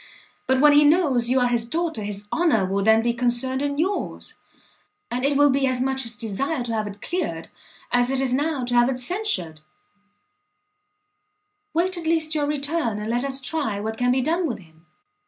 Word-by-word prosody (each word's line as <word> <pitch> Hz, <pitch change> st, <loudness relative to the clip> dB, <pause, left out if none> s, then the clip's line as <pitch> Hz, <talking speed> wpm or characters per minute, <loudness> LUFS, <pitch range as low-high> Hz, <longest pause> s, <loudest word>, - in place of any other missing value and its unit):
But 260 Hz, 0 st, +2 dB
when 295 Hz, +1 st, +6 dB
he 295 Hz, +1 st, +6 dB
knows 290 Hz, -7 st, +3 dB
you 260 Hz, +1 st, +3 dB
are 245 Hz, -, +3 dB
his 240 Hz, -1 st, +2 dB
daughter, 320 Hz, 0 st, -2 dB
his 205 Hz, 0 st, -5 dB
honour 310 Hz, -, +2 dB
will 195 Hz, +2 st, -1 dB
then 220 Hz, +1 st, +4 dB
be 235 Hz, 0 st, +1 dB
concerned 245 Hz, +2 st, 0 dB
in 285 Hz, 0 st, -2 dB
yours, 370 Hz, +6 st, -2 dB, 0.8 s
and 250 Hz, +1 st, -2 dB
it 280 Hz, 0 st, +2 dB
will 290 Hz, 0 st, +5 dB
be 270 Hz, 0 st, +1 dB
as 255 Hz, -1 st, -1 dB
much 265 Hz, +1 st, 0 dB
his 230 Hz, -2 st, -3 dB
desire 245 Hz, +5 st, -2 dB
to 235 Hz, -1 st, -3 dB
have 215 Hz, -1 st, -1 dB
it 205 Hz, 0 st, -10 dB
cleared, 310 Hz, -, -3 dB, 0.4 s
as 245 Hz, 0 st, +2 dB
it 270 Hz, 0 st, 0 dB
is 265 Hz, -2 st, 0 dB
now 285 Hz, -1 st, 0 dB
to 245 Hz, -, -3 dB
have 240 Hz, +1 st, +4 dB
it 260 Hz, -, -2 dB
censured." 250 Hz, -, -1 dB, 2.1 s
"Wait 360 Hz, +2 st, +1 dB
at 335 Hz, -, -8 dB
least 320 Hz, -1 st, +1 dB
your 295 Hz, -2 st, 0 dB
return, 290 Hz, -5 st, -1 dB
and 210 Hz, +2 st, -4 dB
let 240 Hz, +2 st, 0 dB
us 275 Hz, -1 st, -2 dB
try 260 Hz, -6 st, -2 dB
what 220 Hz, +2 st, -4 dB
can 245 Hz, 0 st, +2 dB
be 260 Hz, +1 st, +2 dB
done 330 Hz, +5 st, 0 dB
with 245 Hz, -, -3 dB
him." 160 Hz, -2 st, -20 dB
260 Hz, 200 wpm, -23 LUFS, 230-295 Hz, 2.1 s, when